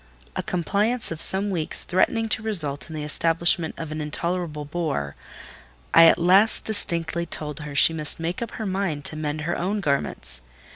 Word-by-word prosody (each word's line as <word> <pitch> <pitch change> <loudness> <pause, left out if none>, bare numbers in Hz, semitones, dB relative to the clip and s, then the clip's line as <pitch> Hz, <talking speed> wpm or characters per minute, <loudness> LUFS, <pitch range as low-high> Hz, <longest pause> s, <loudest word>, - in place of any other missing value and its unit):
A - - -1
compliance 205 +7 -1
of 165 -1 -4
some 200 +2 0
weeks 165 -4 -1
threatening 225 +5 +1
to 215 - +1
result 165 -10 -1
in 160 - -7
the 150 - -4
establishment 165 +2 +2
of 160 -2 -6
an 155 0 -4
intolerable 155 0 -2
bore—I 70 - -1
at 165 - +6
last 190 +5 +4
distinctly 170 -5 0
told 150 -2 -3
her 150 -2 -7
she 165 - +6
must 155 -1 -3
make 170 +5 -3
up 235 - -5
her 220 - -5
mind 185 -7 -2
to - - +1
mend 155 0 -3
her 170 +3 -2
own 195 +4 -1
garments. 140 - -1
165 Hz, 175 wpm, -24 LUFS, 150-185 Hz, -, at